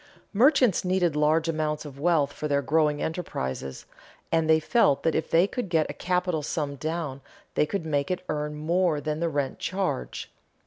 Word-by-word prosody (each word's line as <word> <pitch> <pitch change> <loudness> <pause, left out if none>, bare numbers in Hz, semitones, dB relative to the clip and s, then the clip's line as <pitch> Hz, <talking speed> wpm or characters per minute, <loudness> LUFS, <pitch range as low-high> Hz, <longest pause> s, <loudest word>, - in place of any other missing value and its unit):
Merchants 245 - +4
needed 180 -4 +1
large 155 +2 +2
amounts 155 -1 -1
of 140 -2 -10
wealth 150 -3 +2
for 150 - -4
their 140 -1 +1
growing 150 0 +2
enterprises, 65 - -4 0.5
and 160 -1 +2
they 160 0 +6
felt 155 - +2
that 160 - +2
if 160 - -1
they 170 +3 +5
could 205 -1 -4
get 160 -2 +2
a - - -8
capital 180 -3 -1
sum 145 -1 -3
down 155 -2 -4 0.3
they 150 - +2
could 195 -2 -3
make 145 -3 0
it 185 0 -3
earn 150 0 -2
more 165 +1 +1
than 150 +1 -3
the 170 0 0
rent 140 -3 -2
charge. 185 - -3
155 Hz, 180 wpm, -26 LUFS, 150-175 Hz, 0.5 s, they